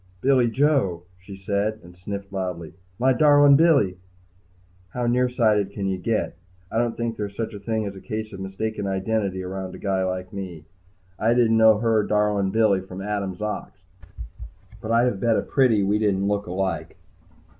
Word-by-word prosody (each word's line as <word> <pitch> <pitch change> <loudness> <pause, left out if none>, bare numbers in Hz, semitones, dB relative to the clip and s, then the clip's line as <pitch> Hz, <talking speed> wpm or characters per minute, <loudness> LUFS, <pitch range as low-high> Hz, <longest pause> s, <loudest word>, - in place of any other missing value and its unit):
"Billy 130 -1 +3
Joe!" 125 - +1 0.2
she 95 +2 -11
said, 100 +3 -2
and 90 0 -14
sniffled 100 +2 -7
loudly. 90 -4 -4 0.2
"My 130 +2 +3
darlin' 145 0 +6
Billy!" 140 - +3 1.0
How 125 -1 -1
near 125 +1 +2
sighted 110 -5 +2
can 100 0 -5
you 95 -1 -1
get? 110 +4 -1 0.4
I 115 - 0
don't 120 -1 -1
think 115 -1 -3
there's 100 -1 -5
such 115 0 -4
a 100 - -7
thing 110 +1 -2
as 100 -1 -5
a 95 - -10
case 110 -2 -5
of 95 - -8
mistaken 100 +2 -4
identity 95 -1 -1
around 95 0 -6
a - - -8
guy 95 -2 -1
like 90 0 -4
me. 90 -5 -7 0.5
I 115 +2 +2
didn't 115 -2 +3
know 110 -1 +6
her 110 0 +2
darlin' 105 -2 +1
Billy 105 -2 +2
from 95 0 -9
Adam's 100 -1 -3
ox. 105 -2 -5 1.0
But 110 - -6
I'd 115 +1 +4
have 120 -6 -1
bet 115 0 +2
a - - 0
pretty 120 -7 +2
we 100 +2 +1
didn't 100 -2 +1
look 100 -1 -1
alike. 95 -2 -3
105 Hz, 180 wpm, -24 LUFS, 95-115 Hz, 1.0 s, darlin